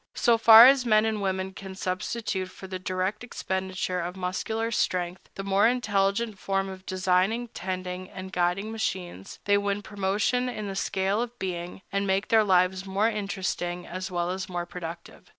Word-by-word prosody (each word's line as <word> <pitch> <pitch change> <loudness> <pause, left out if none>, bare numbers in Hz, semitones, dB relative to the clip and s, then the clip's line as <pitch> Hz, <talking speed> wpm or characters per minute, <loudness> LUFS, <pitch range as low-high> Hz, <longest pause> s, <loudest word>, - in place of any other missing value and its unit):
So 235 -1 +3
far 225 +1 +10
as 265 0 +6
men 215 -2 +4
and 220 -2 -1
women 190 -1 -2
can 190 0 -9
substitute 190 +1 -3
for 190 - -11
the 185 -1 -5
direct 185 +4 -2
expenditure 190 -5 -3
of 175 +1 -4
muscular 220 +5 -2
strength 180 -4 -1
the 195 - -5
more 195 +2 +3
intelligent 220 -2 +1
effort 195 0 -2
of 190 0 -10
designing, 185 +6 +1
tending, 185 -1 -5
and 190 0 -8
guiding 180 +4 0
machines, 185 - -4
they 200 0 +4
win 200 0 -2
promotion 205 +5 0
in 215 -4 -5
the 195 - -5
scale 195 +2 0
of 240 0 -5
being, 180 -1 -5
and 200 0 0
make 190 +1 0
their 220 -1 +5
lives 185 -1 +2
more 195 +3 +1
interesting 190 -4 -3
as 185 +3 -5
well 175 -1 -1
as 185 0 -4
more 175 -1 -3
productive. 170 -1 -9
190 Hz, 170 wpm, -27 LUFS, 185-215 Hz, -, far